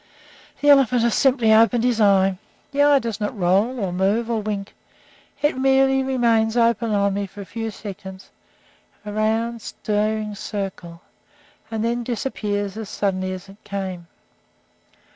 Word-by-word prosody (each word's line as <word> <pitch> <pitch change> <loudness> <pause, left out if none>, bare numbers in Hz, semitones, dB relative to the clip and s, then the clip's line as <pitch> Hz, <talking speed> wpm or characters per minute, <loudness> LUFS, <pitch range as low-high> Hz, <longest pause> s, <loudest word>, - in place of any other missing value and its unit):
The 290 - +6
elephant 250 -4 +4
has 235 -2 +2
simply 250 -5 +3
opened 225 +1 +4
his 240 -2 +1
eye. 195 -2 +3 0.3
The 285 0 +1
eye 290 0 +6
does 230 -4 -3
not 210 +2 -3
roll, 200 +8 +1
or 190 -4 -2
move, 205 +6 0
or 225 -2 0
wink. 205 -1 -4 0.7
It 295 - +2
merely 270 0 +3
remains 235 -4 +1
open 230 -1 +2
on 200 -1 +2
me 200 0 -2
for 200 +2 -11
a - - -8
few 225 +2 -5
seconds, 190 -2 -9 0.7
a 210 - -5
round, 225 +2 0
staring 210 +1 -2
circle, 190 -5 -6 0.7
and 225 0 -2
then 240 +1 -1
disappears 210 -4 -3
as 220 -2 -6
suddenly 185 -2 -1
as 185 +1 -7
it 195 +2 -16
came. 190 -4 -5
215 Hz, 150 wpm, -22 LUFS, 200-235 Hz, 0.7 s, The